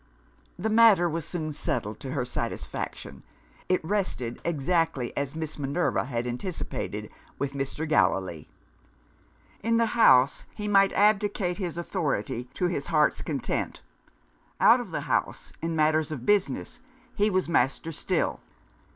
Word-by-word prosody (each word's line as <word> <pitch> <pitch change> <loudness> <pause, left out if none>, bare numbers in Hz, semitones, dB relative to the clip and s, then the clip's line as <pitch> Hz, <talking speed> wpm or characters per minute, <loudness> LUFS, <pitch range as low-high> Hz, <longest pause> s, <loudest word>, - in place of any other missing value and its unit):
The 215 +5 -1
matter 215 -6 +6
was 165 -1 -3
soon 160 -3 -4
settled 125 -9 -2
to 135 - -5
her 130 -4 -1
satisfaction. 115 - -5 0.5
It 185 -3 +1
rested 160 - -2
(exactly 165 -4 0
as 140 +1 -2
Miss 160 -1 -4
Minerva 145 +2 0
had 120 -2 -2
anticipated) 125 +9 -4 0.3
with 140 0 -2
Mr. 140 +3 -3
Gallilee. 95 - +1 1.1
In 230 0 +2
the 230 - +4
house, 135 - +5
he 210 -1 -4
might 195 -1 +5
abdicate 205 -3 +2
his 175 -4 -3
authority 140 - -2
to 180 - 0
his 175 -5 -2
heart's 150 -2 +2
content. 140 - -3 0.8
Out - - +7
of - - -6
the - - -3
house, - - -2
in 165 0 -2
matters 155 0 +2
of 130 -6 -5
business, 180 - 0 0.3
he 210 0 +2
was 185 -2 0
master 160 0 +1
still. 155 - -1
160 Hz, 135 wpm, -27 LUFS, 135-185 Hz, 1.1 s, Out